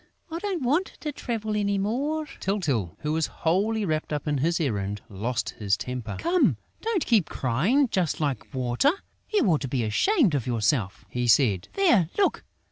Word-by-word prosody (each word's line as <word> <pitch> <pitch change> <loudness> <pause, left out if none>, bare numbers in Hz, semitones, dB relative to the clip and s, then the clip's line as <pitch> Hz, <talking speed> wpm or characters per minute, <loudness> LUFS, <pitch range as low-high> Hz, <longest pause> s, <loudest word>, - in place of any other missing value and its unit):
I 330 - -3
don't 380 -6 -2
want 300 +10 +1
to 300 - -2
travel 220 -6 -3
any 200 -1 +1
more!" 275 +10 -1
Tyltyl, 145 - -1
who 150 0 -1
was 160 -1 +1 0.2
wholly 205 +6 +2
wrapped 155 -3 -2
up 150 0 -3
in 145 -2 +1
his 165 +5 +1
errand, 105 -8 -1
lost 110 +4 -2
his 100 -2 +1
temper: 125 0 -5
"Come, 350 +2 +2 0.2
don't 440 -6 0
keep 220 -8 +3
on - - -7
crying 180 - +2
just 180 -8 0
like 140 -7 -2
Water!... 130 - +2 0.4
You 420 - +3
ought 165 -7 +3
to 135 - -2
be 125 -2 -1
ashamed 220 - +3
of 135 -5 -1
yourself!" 110 -4 0
he 120 +4 -2
said. 105 -5 +3
"There! 240 - +4
Look! 400 - +2
160 Hz, 180 wpm, -26 LUFS, -, 0.4 s, There